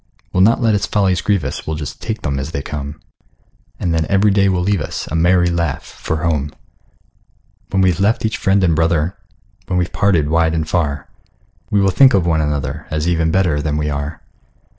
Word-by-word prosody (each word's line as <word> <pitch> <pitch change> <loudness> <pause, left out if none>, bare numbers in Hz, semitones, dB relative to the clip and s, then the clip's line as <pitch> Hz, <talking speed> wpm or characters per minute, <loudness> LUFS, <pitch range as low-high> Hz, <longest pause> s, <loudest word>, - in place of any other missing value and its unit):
We'll 90 - +2
not 110 +5 +4
let 110 -2 +3
its 105 - 0
follies 95 -5 +1
grieve 100 -5 +1
us, 70 - -5
We'll 80 - -2
just 75 -1 -7
take 110 -1 -4
them 70 -3 -1
as 70 +3 -4
they 70 - -3
come; 75 +1 -6 0.8
And 85 - -1
then 80 -1 0
every 100 +1 +3
day 100 0 +3
will 90 -2 0
leave 100 -2 +1
us - - -5
A - - -2
merry 90 +1 +3
laugh 85 -5 -1
for 80 -1 -5
home. 75 -4 -1 1.1
When 95 -1 +1
we've 90 -1 +2
left 105 +3 +1
each 110 - -1
friend 95 0 +2
and 85 -3 +3
brother, 80 +2 +1 0.5
When 90 - -1
we're 90 -1 +1
parted 95 -7 +1
wide 80 +1 +2
and 80 -1 -2
far, 75 -5 -1 0.6
We 100 - +2
will 95 0 +3
think 130 +6 +6
of 90 -4 +2
one 80 -2 +2
another, 75 0 -3
As 75 +1 -2
even 85 -2 +1
better 85 -4 +1
than 75 0 -1
we 75 0 -1
are. 75 +2 -5
85 Hz, 205 wpm, -18 LUFS, 75-95 Hz, 1.1 s, think